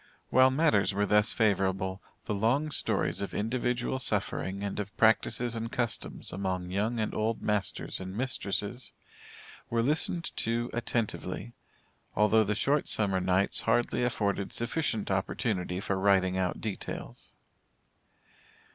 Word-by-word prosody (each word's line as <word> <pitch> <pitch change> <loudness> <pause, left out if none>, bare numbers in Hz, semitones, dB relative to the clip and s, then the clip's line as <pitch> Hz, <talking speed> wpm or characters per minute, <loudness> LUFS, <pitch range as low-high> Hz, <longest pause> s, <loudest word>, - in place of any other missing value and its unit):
While 130 +1 +6
matters 130 -9 +2
were 100 +1 +2
thus 105 +1 +3
favorable, 95 -2 +1 0.2
the - - -2
long 125 +9 +1
stories - - 0
of 100 - -4
individual 120 +3 -1
suffering 100 -5 -1
and 100 0 -3
of 100 0 -5
practices 115 +1 +3
and 115 0 -4
customs 120 -4 -3
among 95 -2 -2
young 110 +5 0
and 110 - -1
old 110 +1 -1
masters 105 -2 -1
and 95 +1 -6
mistresses, 120 -2 -2 0.8
were 115 0 +1
listened 160 +5 0
to 120 +1 0
attentively, 115 - -2 0.6
although 105 +1 +4
the 105 0 -1
short 140 +6 +1
summer 95 -3 +2
nights 95 +2 +2
hardly 120 +2 +1
afforded 100 -5 -1
sufficient 120 -4 -1
opportunity 95 -1 -1
for 100 0 -1
writing 95 -2 +3
out 95 -1 -1
details. 105 -3 -6
105 Hz, 130 wpm, -29 LUFS, 95-120 Hz, 0.8 s, While